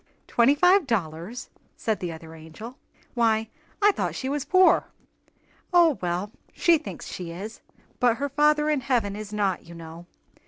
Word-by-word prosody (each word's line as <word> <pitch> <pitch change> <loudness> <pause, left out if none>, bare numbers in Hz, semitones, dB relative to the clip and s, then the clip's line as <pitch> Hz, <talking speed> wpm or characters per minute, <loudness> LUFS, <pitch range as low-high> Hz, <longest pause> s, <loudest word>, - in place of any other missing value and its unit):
"Twenty 240 +4 +3
five 360 +1 +4
dollars!" 190 +3 -3 0.3
said 220 -3 -1
the 175 -2 -4
other 160 0 -10
angel. 160 +10 -11 0.3
"Why, 225 -2 +1 0.3
I 415 - +7
thought - - -3
she 260 - -3
was 285 -1 -2
poor?" 370 0 +5 0.9
"O, 340 -5 +4
well, 180 +3 -2 0.2
she 335 -2 +3
thinks 310 - -8
she 180 -2 -6
is, 195 +7 -8 0.4
but 240 -2 +3
her 285 +1 -2
Father 300 +2 +3
in 295 -3 0
heaven 235 -6 0
is 210 0 -7
not, 200 -5 -1
you 170 - -11
know! 165 +1 -10
225 Hz, 160 wpm, -25 LUFS, 175-285 Hz, 0.9 s, I